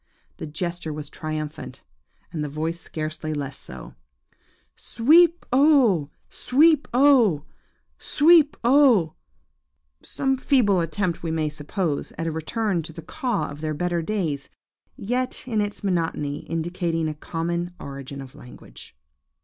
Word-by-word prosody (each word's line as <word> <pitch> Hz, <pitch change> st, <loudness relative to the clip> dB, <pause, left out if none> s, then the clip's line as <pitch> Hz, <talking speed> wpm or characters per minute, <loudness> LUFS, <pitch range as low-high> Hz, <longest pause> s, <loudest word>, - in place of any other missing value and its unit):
The -, -, -6 dB
gesture 170 Hz, +1 st, -4 dB
was 150 Hz, -1 st, -7 dB
triumphant, 155 Hz, -1 st, -6 dB, 0.5 s
and 155 Hz, -2 st, -2 dB
the 150 Hz, -, -3 dB
voice 160 Hz, +3 st, -3 dB
scarcely 155 Hz, -1 st, -5 dB
less 140 Hz, -2 st, -4 dB
so,–Sweep 150 Hz, -, -1 dB
o 255 Hz, -, +5 dB
oh! 240 Hz, -, +4 dB, 0.2 s
Sweep 300 Hz, +3 st, +3 dB
oh! 240 Hz, -, +4 dB, 0.5 s
Sweep 310 Hz, -1 st, +4 dB
oh! 240 Hz, -, +5 dB, 0.9 s
Some 270 Hz, -1 st, -1 dB
feeble 225 Hz, -10 st, +3 dB
attempt, 170 Hz, +2 st, -2 dB
we 165 Hz, -, -3 dB
may 160 Hz, -1 st, 0 dB
suppose, 150 Hz, +1 st, -3 dB
at 165 Hz, -, -3 dB
a 165 Hz, -, -1 dB
return 175 Hz, +4 st, -1 dB
to 160 Hz, -, -9 dB
the 165 Hz, -, -9 dB
caw 240 Hz, -, -2 dB
of 145 Hz, +1 st, -10 dB
their 155 Hz, -1 st, -2 dB
better 175 Hz, +1 st, -1 dB
days, 160 Hz, -7 st, -3 dB, 0.5 s
yet, 250 Hz, +4 st, -3 dB
in 220 Hz, -4 st, 0 dB
its 205 Hz, 0 st, -4 dB
monotony, 165 Hz, -6 st, -2 dB
indicating 165 Hz, 0 st, -2 dB
a 155 Hz, -, -2 dB
common 170 Hz, +3 st, -4 dB
origin 140 Hz, 0 st, -8 dB
of 130 Hz, -1 st, -11 dB
language. 125 Hz, -, -13 dB
170 Hz, 130 wpm, -24 LUFS, 155-230 Hz, 0.9 s, o